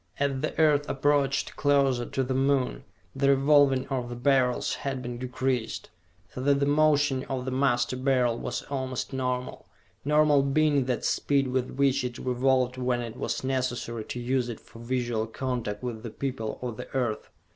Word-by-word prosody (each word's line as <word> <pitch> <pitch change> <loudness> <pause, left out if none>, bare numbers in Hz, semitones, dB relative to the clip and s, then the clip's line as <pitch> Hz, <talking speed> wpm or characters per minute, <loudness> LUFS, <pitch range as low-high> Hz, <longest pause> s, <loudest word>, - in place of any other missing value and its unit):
As 140 -2 0
the 155 - -3
Earth 150 -2 +3
approached 140 0 +1
closer 135 -4 +2
to 135 - -1
the 130 +1 -2
Moon, 135 0 +1 0.3
the 135 +1 +2
revolving 140 -1 +4
of 125 -3 -2
the 120 - -5
Beryls 125 -1 +2
had 135 -2 -3
been 120 0 -5
decreased, 125 -2 -2 0.4
so 130 - -5
that 140 +1 +3
the 140 - +2
motion 145 -2 +3
of 130 -2 -4
the 130 - -2
Master 130 -2 +1
Beryl 130 -2 +2
was - - -4
almost 130 -1 -4
normal 125 -1 -3 0.4
normal 150 0 +4
being 140 0 +2
that 125 -2 -2
speed 140 -2 +1
with 130 0 -1
which 140 -1 +2
it 125 0 -4
revolved 130 0 +1
when 125 -1 0
it 115 -2 -5
was - - -3
necessary 125 -3 -2
to 125 - -5
use 125 0 0
it 115 - -6
for 115 - -16
visual 120 -2 -1
contact 115 -3 -4
with 120 -3 -4
the 115 - -6
people 120 -3 -4
of 120 -3 -4
the - - -7
Earth. 120 -5 -1
130 Hz, 175 wpm, -27 LUFS, 125-140 Hz, 0.4 s, revolving